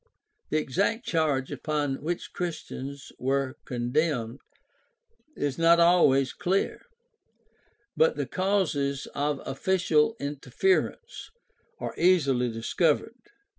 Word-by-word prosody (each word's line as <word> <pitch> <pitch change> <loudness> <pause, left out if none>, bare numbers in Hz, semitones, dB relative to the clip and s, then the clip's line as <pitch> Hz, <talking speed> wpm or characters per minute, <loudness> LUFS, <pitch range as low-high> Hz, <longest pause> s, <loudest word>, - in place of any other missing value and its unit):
The - - +1
exact 195 - 0
charge 150 -5 0
upon 145 -3 -2
which 170 +3 -4
Christians 140 -5 -6
were 135 0 -1
condemned 125 0 -1 1.0
is 145 +1 -2
not 165 +1 +5
always 145 -7 +4
clear, 190 +2 -1 1.1
but 480 0 +3
the - - -2
causes 160 -8 0
of 145 0 -1
official 175 +4 +1
interference 375 - -1 0.5
are - - -5
easily 140 -9 +3
discovered. 150 - 0
150 Hz, 95 wpm, -27 LUFS, 135-175 Hz, 1.1 s, not